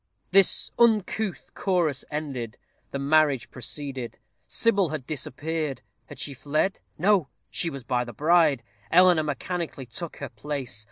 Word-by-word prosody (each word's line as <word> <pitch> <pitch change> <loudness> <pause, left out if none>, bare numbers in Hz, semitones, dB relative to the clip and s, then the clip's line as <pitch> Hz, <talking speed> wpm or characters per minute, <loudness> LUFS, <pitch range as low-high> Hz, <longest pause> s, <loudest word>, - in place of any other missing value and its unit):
This 195 0 +4
uncouth 220 -3 +2
chorus 170 -8 +1
ended, 135 -7 -4 0.3
the - - -3
marriage 145 -2 +3
proceeded. 130 -1 -4 0.3
Sybil 200 -7 +3
had 150 -4 -4
disappeared. 150 -1 -3 0.2
Had - - -10
she 145 - -3
fled? 145 +8 0 0.2
No! 190 -2 +3 0.2
she 170 - +1
was 140 -4 -7
by 125 0 0
the 120 - -8
bride. 150 0 +3 0.3
Eleanor 180 -2 +6
mechanically 155 -1 -3
took 160 +8 -6
her 140 - -5
place. 130 0 -4
150 Hz, 130 wpm, -26 LUFS, 135-175 Hz, 0.3 s, Eleanor